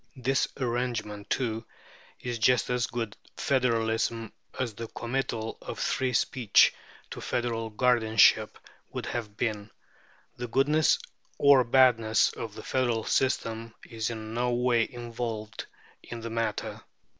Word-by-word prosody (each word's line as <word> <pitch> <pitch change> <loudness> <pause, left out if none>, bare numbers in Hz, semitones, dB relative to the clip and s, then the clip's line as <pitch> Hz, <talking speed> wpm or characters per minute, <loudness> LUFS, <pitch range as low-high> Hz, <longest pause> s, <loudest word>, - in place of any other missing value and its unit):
This 130 +1 +1
arrangement, 120 -5 -2
too, 115 -3 -1 0.6
is 120 -2 -4
just 125 +2 +3
as 125 -1 +1
good 115 -3 -4 0.2
federalism 115 -3 0 0.3
as 125 -4 -1
the 115 +2 -6
committal 120 -2 -3
of - - -6
free 130 -1 0
speech 115 -3 +4 0.4
to - - -6
federal 115 -2 -2
guardianship 110 -2 +4 0.3
would - - -4
have 110 -3 -5
been. 110 -3 -2 0.7
The 120 - -4
goodness 145 +6 +3 0.4
or 140 -2 +6
badness 115 -3 +4
of 110 -2 -6
the - - -8
federal 120 -4 0
system 115 -3 -1
is 110 -1 -3
in 110 -1 -6
no 120 +1 0
way 120 -1 +2
involved 115 -2 -5 0.3
in 120 -1 -8
the 115 0 -5
matter. 115 0 -2
115 Hz, 125 wpm, -28 LUFS, 110-125 Hz, 0.7 s, or